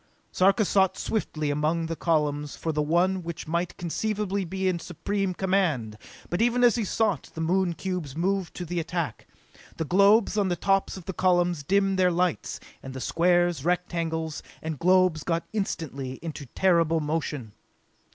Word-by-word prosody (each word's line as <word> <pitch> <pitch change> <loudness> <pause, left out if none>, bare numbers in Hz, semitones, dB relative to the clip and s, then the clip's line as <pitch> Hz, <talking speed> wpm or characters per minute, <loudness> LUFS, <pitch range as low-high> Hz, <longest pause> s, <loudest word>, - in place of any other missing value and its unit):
Sarka 195 +3 +3
sought 190 0 +2
swiftly 155 -9 -2
among 155 +3 0
the 165 0 -3
columns 150 -3 0
for 160 - -2
the 150 -1 0
one 175 +5 +2
which 170 -2 -6
might 170 +2 -2
conceivably 200 +3 -2
be 190 +2 -2
in 180 -2 +1
supreme 190 +3 -2
command; 170 - 0 0.4
but 175 - 0
even 240 +1 +3
as 240 -2 +6
he 235 - -1
sought 205 - 0
the - - -6
Moon 175 +2 +1
cubes 175 -6 -4
moved 185 +1 -1
to 180 - -5
the 175 +1 -2
attack. 165 -6 -3 0.5
The 160 - -2
globes 200 +5 +4
on 200 - +2
the 175 - 0
tops 195 +2 +1
of 180 - -10
the 190 - -4
columns 175 -3 +2
dimmed 195 +4 +1
their 180 -1 +5
lights, 175 - -1 0.2
and 130 0 -8
the - - -4
squares, 175 0 +2
rectangles 165 -2 -1 0.2
and 160 -3 -5
globes 185 -3 +3
got 165 -1 -1
instantly 150 -10 -3
into 155 -4 -6
terrible 165 -3 +3
motion. 150 -6 -3
175 Hz, 165 wpm, -26 LUFS, 160-190 Hz, 0.5 s, as